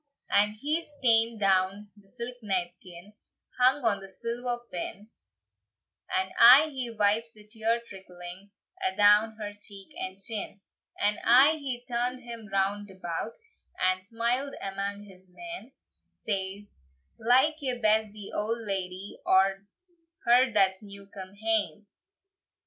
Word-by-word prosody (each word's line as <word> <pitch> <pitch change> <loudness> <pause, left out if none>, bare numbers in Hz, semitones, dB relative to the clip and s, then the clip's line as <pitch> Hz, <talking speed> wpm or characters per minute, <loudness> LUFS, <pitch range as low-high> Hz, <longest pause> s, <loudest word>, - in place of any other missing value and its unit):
And 210 +1 +3
he's 295 +5 -2
taen 230 -1 +4
down 195 +1 +1
the 205 -2 -21
silk 245 +3 -6
napkin, 180 -1 -5 0.5
Hung 255 +1 +4
on 200 -3 +2
a 195 - -10
silver 240 +4 -3
pin, 200 +5 -6 1.0
And 190 0 0
aye 265 +7 +9
he 255 -3 -3
wipes 220 +1 +1
the 210 -1 -14
tear 225 +2 0
trickling 185 -1 -10 0.3
A'down 215 - +4
her 210 -2 -5
cheek 200 -1 -10
and 185 0 -5
chin. 205 0 -5 0.4
And 205 +1 +1
aye 260 +6 +7
he 255 -4 -5
turn'd 245 +1 -1
him 235 -3 -8
round 200 +1 0
about, 185 +3 -5 0.5
And 185 0 +1
smiled 235 +6 -1
amang 200 +1 -4
his 190 -2 -16
men; 335 - -9 0.4
Says, 200 0 -4 0.5
"Like 265 +7 +3
ye 255 -3 -1
best 215 -1 +3
the 205 -1 -9
old 220 +3 -1
ladye, 190 0 -4
Or 195 +1 +2 0.6
her 245 +1 +5
that's 195 -2 +3
new 200 -1 -11
come 190 0 -9
hame?" 215 -1 0
210 Hz, 130 wpm, -28 LUFS, 195-235 Hz, 1.0 s, aye